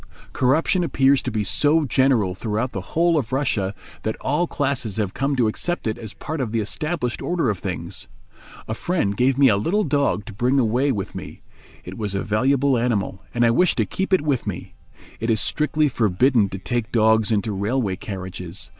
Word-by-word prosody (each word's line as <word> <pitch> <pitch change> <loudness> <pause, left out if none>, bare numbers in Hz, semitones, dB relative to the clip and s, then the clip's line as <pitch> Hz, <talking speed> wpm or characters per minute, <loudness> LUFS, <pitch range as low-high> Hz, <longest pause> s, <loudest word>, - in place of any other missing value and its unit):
Corruption 155 +8 +2
appears 135 -3 +3
to 130 - -3
be 110 -3 -1
so 150 +9 +2
general 130 -8 +2
throughout 110 +5 -2
the 95 - -4
whole 165 - +2
of 120 -4 -5
Russia 115 -8 0 0.3
that 110 - -2
all 150 +6 0
classes 135 -10 -2
have 100 -4 -1
come 140 +1 0
to 120 -4 +2
accept 175 +11 -2
it 110 +1 -2
as 110 -2 -6
part 155 -1 -4
of 120 -5 -2
the 115 - 0
established 135 +3 -2
order 165 -10 0
of 100 - -5
things. 90 -1 -5 0.6
A 110 - -2
friend 115 - -1
gave 130 +3 +2
me 140 -1 +6
a 105 -5 +4
little 185 - +1
dog 140 - 0
to 110 - -9
bring 125 +6 +1
away 130 +3 +2
with 100 -6 -4
me. - - -9 0.4
It - - -9
was 105 -2 -2
a 100 - -1
valuable 130 +5 +2
animal, 105 -5 -1
and 120 -1 +2
I 115 - +4
wished 180 +9 +3
to - - +2
keep 190 +1 -3
it 190 - +4
with 140 -6 -1
me. 95 -4 -5 0.5
It 115 - -2
is 110 -2 +3
strictly 150 - +1
forbidden 115 -1 +2
to 95 - -5
take 115 +3 -2
dogs 110 -1 +3
into 105 0 0
railway 100 +1 -1
carriages. 95 -1 -6
120 Hz, 200 wpm, -22 LUFS, 105-140 Hz, 0.6 s, me